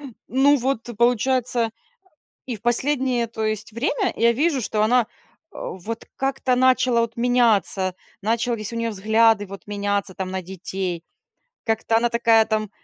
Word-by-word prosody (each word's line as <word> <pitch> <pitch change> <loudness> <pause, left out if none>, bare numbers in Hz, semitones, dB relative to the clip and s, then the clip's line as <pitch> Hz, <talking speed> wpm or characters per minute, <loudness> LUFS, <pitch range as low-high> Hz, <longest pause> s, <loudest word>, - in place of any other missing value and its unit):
Э, 290 - -12 0.2
ну 275 +3 +4
вот, 255 -2 -2
получается, 240 0 +2 0.8
и 245 -4 -4
в 210 - -20
последнее, 250 0 +1
то 220 -1 -5
есть 215 0 -3
время 330 - 0
я 235 +1 +4
вижу, 285 +2 +1
что 210 -1 -1
она, 235 +1 +3 0.4
а, - - -7
вот 220 +5 -7
как-то 270 -1 0
начала 255 -2 +3
вот 230 0 -2
меняться, 230 -6 +2 0.3
начались 230 0 -1
у - - -5
нее 230 0 -1
взгляды 220 +1 +3
вот 195 +1 -11
меняться 205 -1 -2
там 185 0 -4
на 190 0 -3
детей, 185 -1 -5 0.6
как-то 225 0 +1
она 235 +1 +3
такая 230 -1 +4
там, 215 -2 -1
230 Hz, 155 wpm, -22 LUFS, 210-245 Hz, 0.8 s, ну